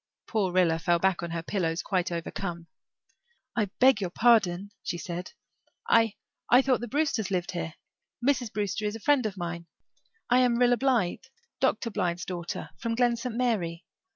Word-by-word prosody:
Poor 200 -5 0
Rilla 175 -3 +3
fell 170 +1 +2
back 190 +1 +1
on 170 - -4
her 165 0 -4
pillow, 170 -4 -1
quite 185 -2 0
overcome. 170 0 -4 0.9
"I 215 -3 +2
beg 260 -5 +5
your 185 - -1
pardon," 200 -3 +3
she 175 - -3
said. 175 +1 -6 0.5
"I 225 -2 +4 0.3
I 250 +2 +6
thought 260 -2 +2
the 240 - -5
Brewsters 280 -6 0
lived 180 -2 -1
here. 170 -3 -4 0.5
Mrs. 250 -6 +1
Brewster 210 0 -2
is 210 +1 -1
a - - -6
friend 270 -1 +3
of 200 -2 -7
mine. 170 -1 -5 0.6
I 250 +1 +4
am 250 -2 +3
Rilla 245 0 +4
Blythe 255 -5 +1 0.3
Dr. 235 -3 +1
Blythe's 180 -4 -1
daughter 175 -2 -5
from 230 0 -2
Glen 240 0 +3
St. 235 0 -5
Mary. 195 -9 -1
205 Hz, 170 wpm, -28 LUFS, 175-240 Hz, 0.9 s, I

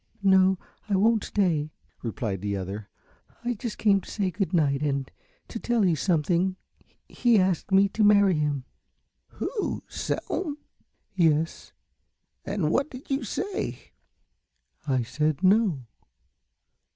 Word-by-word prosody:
"No, 190 -1 +5 0.3
I 200 - +2
won't 220 +2 +3
stay," 165 -7 +1 0.3
replied 110 -5 -3
the 100 -1 -2
other, 100 +2 -6 0.5
"I 245 0 0
just 230 0 -5
came 200 -2 +3
to - - -13
say 195 -3 -1
good 185 +1 -2
night 145 -6 +2
and 140 -2 -1 0.4
tell 230 -2 0
you 175 -3 +3
something 175 +3 +1 0.5
He 240 -2 +3
asked 185 -1 +1
me 195 +1 +6
to 215 - 0
marry 205 -2 +6
him." 145 -4 -1 0.7
"Who 445 -5 -3
Selm?" 300 -6 -3 0.6
"Yes." 165 -3 +1 0.7
"And 195 -6 -1
what 280 - +1
did 255 +2 -10
you 270 +1 0
say?" 405 -1 -4 1.0
"I 130 -3 +1
said 150 +7 -1
'No.'" 190 - +3
185 Hz, 125 wpm, -26 LUFS, 150-210 Hz, 1.0 s, me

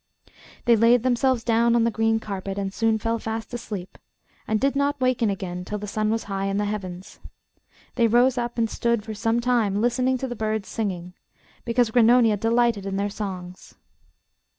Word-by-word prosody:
They 235 -1 +6
laid 230 +2 +4
themselves 255 -1 +1
down 235 0 +3
on 235 - +3
the 230 - +2
green 225 0 +1
carpet 195 -2 -5
and 195 -1 -3
soon 225 0 +1
fell 230 +2 -2
fast 225 +2 -5
asleep, 205 -6 -6 0.5
and 220 -1 +1
did 275 +2 +1
not 285 0 0
waken 255 -3 +1
again 180 -2 -4
till 210 +3 -4
the 210 - -6
sun 215 +1 -1
was 225 +1 -1
high 195 -1 -3
in 195 0 -1
the 205 - 0
heavens. 195 -2 -6 0.7
They 235 -2 +3
rose 245 +3 +4
up 240 -1 -3
and 230 -1 +2
stood 235 -1 -1
for 220 0 -6
some 225 +2 0
time 235 -5 +1
listening 250 +3 +1
to 265 - -4
the 245 - -5
birds 215 -2 -2
singing, 180 -5 -4 0.5
because 235 -1 +1
Grannonia 230 -2 +5
delighted 225 -2 +1
in 195 0 -2
their 200 +1 -1
songs. 185 -3 -7
225 Hz, 185 wpm, -24 LUFS, 200-240 Hz, 0.7 s, They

